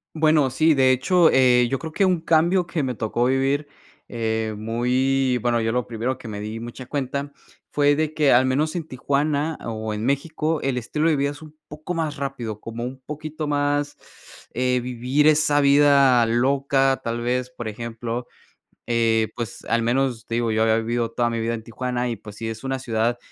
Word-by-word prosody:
Bueno, 155 -3 +3
sí, 155 +5 +3
de 130 -2 +4
hecho, 165 +6 +4
eh, 125 -2 +4
yo 135 - 0
creo 160 - -6
que 195 +5 +2
un 180 -3 +1
cambio 170 +3 +3
que 170 -2 -2
me 130 -2 -2
tocó 110 +3 -1
vivir, 135 +3 +1 0.4
eh, 110 -2 -2
muy 125 +4 +1
bueno, 120 0 +1
yo 115 - 0
lo 125 +1 -1
primero 120 +3 -3
que 120 - -11
me 105 -2 -6
di 110 +2 -5
mucha 120 +2 -8
cuenta 140 0 -3 0.4
fue 145 0 +3
de 155 0 -1
que 150 -3 +3
al 125 +2 +5
menos 150 +6 0
en 165 -3 -4
Tijuana 145 +4 -1
o 110 -1 -4
en 105 +2 -3
México 155 +3 -1
el 135 -2 -1
estilo 150 +7 0
de 160 - +3
vida 140 +1 +1
es 145 - -12
un 155 0 -14
poco 150 +4 -6
más 160 -3 -2
rápido, 125 -6 -5
como 115 +1 -6
un 130 +2 -6
poquito 155 +1 -5
más, 145 0 0 0.6
eh, 125 +1 +1
vivir 125 +4 0
esa 150 -1 +4
vida 140 -3 +5
loca, 135 +3 +2
tal 115 0 -3
vez, 125 +1 -1
por 120 -3 -7
ejemplo. 115 +2 -5 0.6
Eh, 115 -2 +2
pues 115 -4 -6
al 115 0 +1
menos, 120 -1 0
te 115 - -4
digo, 115 -1 0
yo 110 0 +1
había 110 0 +3
vivido 115 0 -1
toda 120 0 0
mi 115 - -2
vida 115 +1 -1
en 110 - -6
Tijuana 125 +2 -3
y, 115 - -3
pues 105 -1 -12
sí, 115 0 -5
es 115 +2 -7
una 135 0 -2
ciudad 115 0 0
130 Hz, 200 wpm, -23 LUFS, 115-145 Hz, 0.6 s, al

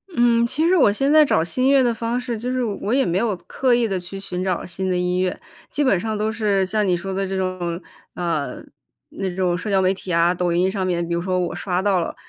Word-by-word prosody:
嗯， 235 -1 +4
其 310 +7 0
实 365 - +4
我 275 - +5
现 270 +7 0
在 310 0 +7
找 215 - +2
新 215 +10 -1
音 270 - +5
乐 275 -2 +5
的 240 -1 +2
方 230 +2 -2
式， 245 -2 -4
就 245 +3 -3
是 255 -1 0
我 210 -1 -3
也 270 0 +3
没 175 +2 0
有 220 -3 0
刻 255 -2 +1
意 235 -1 +1
地 190 -2 -2
去 180 +2 -8
寻 185 -2 -4
找 185 -2 -1
新 185 +2 -3
的 180 - +1
音 180 0 0
乐。 185 -1 -1 0.3
基 290 - -1
本 230 -10 +3
上 220 +2 -3
都 215 +1 0
是， 205 -3 +1
像 210 +1 0
你 180 - +2
说 190 +2 -5
的 195 +1 -1
这 190 0 -3
种， 185 -2 -2 0.4
呃， 160 -7 -3 0.5
那 195 -1 -4
种 180 -2 +1
社 180 +4 -4
交 195 -1 +3
媒 185 +1 +3
体 190 -1 -7
啊， 170 +1 +3
抖 180 -1 -1
音 180 +2 +2
上 190 -2 -2
面， 175 -2 -1
比 170 - -2
如 170 - 0
说 185 +1 -1
我 175 -1 -2
刷 180 -2 -2
到 195 -2 +2
了， 170 - -3
190 Hz, 290 characters per minute, -21 LUFS, 180-230 Hz, 0.5 s, 在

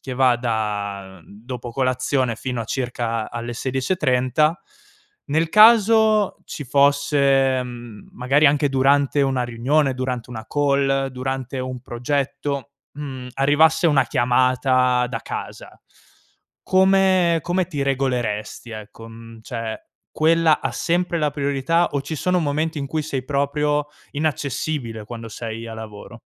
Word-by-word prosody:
che 130 - -6
va 125 -1 +4
da 105 -5 -3
dopo 120 +3 -8
colazione 130 -1 0
fino 125 0 -4
a - - -3
circa 120 -2 -3
a 120 - -5
alle 120 +1 -5
16:30, 130 +3 0 0.7
nel 160 +3 +1
caso 215 0 +5
ci 145 - -7
fosse, 140 -1 +3
mhmm, 120 -4 -10
magari 135 +5 +3
anche 145 +1 +3
durante 140 +1 +2
una 135 -2 +1
riunione, 130 +4 +1
durante 125 -2 -4
una 110 -2 -7
call, 140 -1 +1
durante 130 0 -4
un 130 -1 -5
progetto, 140 +3 -3 0.2
mhmm, 135 -4 -7
arrivasse 145 +5 +3
una 145 -5 +4
chiamata 125 0 +2
da - - -4
casa, - - -8 0.8
come 190 -2 +3
come 180 +1 0
ti 155 -5 -5
regoleresti, 125 -5 -2
ecco? 110 +1 -10
Mhmm, 115 0 -12
cioè, 115 -1 -5 0.3
quella 160 0 +3
ha - - -2
sempre 175 0 0
la 150 -2 +1
priorità 145 +4 0
o 140 -1 -1
ci 155 +3 -5
sono 180 +4 +1
momenti 155 +1 -1
in 140 - -3
cui 155 +3 -2
sei 135 -4 -4
proprio 145 +1 0 0.3
inaccessibile 140 -5 -3
quando 115 +1 -8
sei 115 +1 -6
a 115 - -7
lavoro? 110 -2 -10
135 Hz, 130 wpm, -21 LUFS, 120-150 Hz, 0.8 s, caso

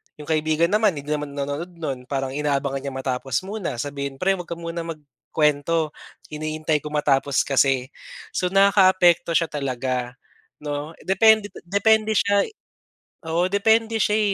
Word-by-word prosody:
'yong 150 - -10
kaibigan 155 +2 +1
naman 210 -3 +3
hindi 145 +1 -6
naman 150 -1 -3
nanonood 145 +4 -3
no'n, 135 -6 -5
parang 135 -1 -2
inaabangan 140 -1 -1
niya 135 0 -6
matapos 130 +1 -2
muna, 200 - -4
sabihin, 140 +2 -4
"Pre 190 +6 0
huwag 175 - -7
ka 170 - -4
muna 170 0 -5
magkuwento, 150 0 -1 0.4
hinihintay 155 0 -1
ko 150 - -8
matapos 145 -2 +1
kasi". 135 -1 +1 0.4
So, 180 - 0
nakakaapekto 185 -3 +4
siya 165 0 +2
talaga, 130 -3 -3 0.5
'no, 145 +2 -4
depende 210 +2 +4 0.2
depende 215 +3 +3
siya 200 -1 +3 0.8
oo, 170 +2 +2
depende 220 +3 +2
siya 210 +2 +2
155 Hz, 140 wpm, -23 LUFS, 140-185 Hz, 0.8 s, nakakaapekto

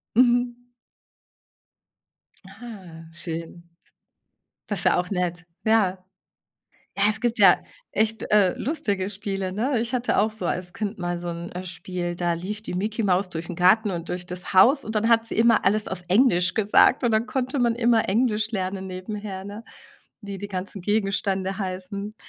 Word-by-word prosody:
Mhm. 245 0 +3 1.8
Ah. 195 -6 -11
Schön. 170 0 -5 1.0
Das 205 -4 -2
ist - - -3
ja - - +4
auch 180 +2 -2
nett. 180 -2 -2 0.2
Ja. 210 -4 +3 1.0
Ja, - - +3
es 215 0 -1
gibt 240 -1 0
ja 195 -4 +6 0.3
echt, 220 +1 0
äh, 200 -4 +4
lustige 205 - -1
Spiele, 195 -2 -4
ne? 240 +4 0
Ich 235 +2 -3
hatte 250 0 0
auch 215 +1 +3
so 190 -5 -4
als 180 0 -2
Kind 215 0 -4
mal 175 -1 -2
so 175 0 -5
'n, 170 +1 -6
äh, 180 +1 -6
Spiel, 180 -1 -5
da 175 -1 0
lief 205 +6 -5
die - - -4
Micky 215 +5 -2
Maus 185 -1 +2
durch 165 -1 -5
Garten 195 +4 +4
und 170 -1 -5
durch 180 0 -4
das 180 +1 0
Haus 255 +10 +6
und 220 0 -6
dann 220 +2 +2
hat 230 -1 +4
sie 225 - -2
immer 230 -1 +4
alles 210 +2 +2
auf 190 -1 -5
Englisch 185 -3 +3
gesagt 220 +5 +4
und 240 - +2
dann 220 +2 +1
konnte 265 +1 -2
man 235 -1 +2
immer 235 -3 +2
Englisch 220 0 +1
lernen 190 -1 -3
nebenher, 190 +1 -6
ne, 205 +3 -8 0.6
wie 200 -1 -7
die 205 - -5
ganzen 190 0 -5
Gegenstände 195 -1 -1
heißen. 200 +3 -5
200 Hz, 170 wpm, -24 LUFS, 180-220 Hz, 1.8 s, ja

